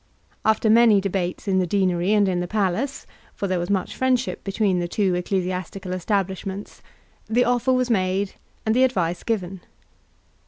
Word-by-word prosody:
After 220 0 +2
many 220 -1 +6
debates 190 0 -3
in 190 -1 +2
the 180 - 0
deanery 185 0 +1
and 205 -2 +4
in 180 -2 0
the 175 - -2
palace, 210 +7 -1 0.3
for - - -3
there 185 -2 0
was 175 - -3
much 195 -2 -1
friendship 260 -1 0
between 195 -2 0
the 175 - -1
two 190 +1 0
ecclesiastical 185 +1 -3
establishments, 190 +1 -3 0.5
the 245 +3 +3
offer 245 +1 +1
was 255 -1 +1
made 190 -1 0 0.3
and 220 +1 +2
the 255 - +5
advice 175 -9 0
given. 190 -5 -3
195 Hz, 160 wpm, -23 LUFS, 185-220 Hz, 0.5 s, many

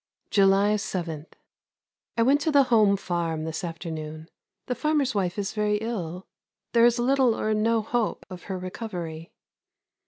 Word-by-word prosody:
July 200 +1 +4
7. 170 -6 -4 0.9
I - - +3
went 280 +4 +4
to 315 - +1
the 285 -2 +6
home 210 -3 +5
farm 170 -4 -2
this 160 +1 -4
afternoon. 160 -2 -6 0.4
The 250 - -1
farmer's 280 +1 +1
wife 190 -3 -1
is 200 -1 -2
very 210 -1 +1
ill. 190 -6 -4 0.5
There 235 -1 +6
is 240 0 +2
little 250 -1 +2
or 215 - 0
no 220 +1 +2
hope 235 0 -1
of 185 -2 -10
her 190 -2 -4
recovery. 180 -4 -6
200 Hz, 150 wpm, -26 LUFS, 175-230 Hz, 0.9 s, the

